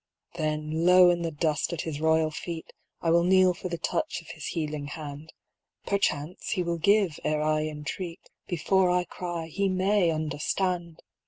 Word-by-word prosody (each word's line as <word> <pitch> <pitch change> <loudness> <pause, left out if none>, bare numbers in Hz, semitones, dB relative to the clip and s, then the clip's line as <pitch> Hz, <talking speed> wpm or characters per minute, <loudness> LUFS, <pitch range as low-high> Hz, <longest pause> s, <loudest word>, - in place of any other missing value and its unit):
" - - -61
Then 155 0 -2
low 180 0 +8
in 175 -1 -1
the 165 - -1
dust 155 +1 -1
at 170 - -2
his 155 -2 -5
royal 160 0 +3
feet 165 +1 -6 0.3
I 165 - +1
will 170 +1 +5
kneel 185 0 +5
for 180 - -6
the 170 - -3
touch 310 - -2
of 165 - -16
his 155 - -7
healing 150 -3 -3
hand; 150 +1 -8 0.5
Perchance 180 -5 -1
he 185 - 0
will 170 -1 -2
give 200 -3 +3
ere 150 0 0
I 155 0 +1
entreat. 160 +3 -6 0.2
Before 180 +2 +2
I 180 0 +2
cry 175 -1 -5
he 195 +5 -1
may 190 0 +2
understand 165 +3 -2
165 Hz, 175 wpm, -27 LUFS, 155-180 Hz, 0.5 s, low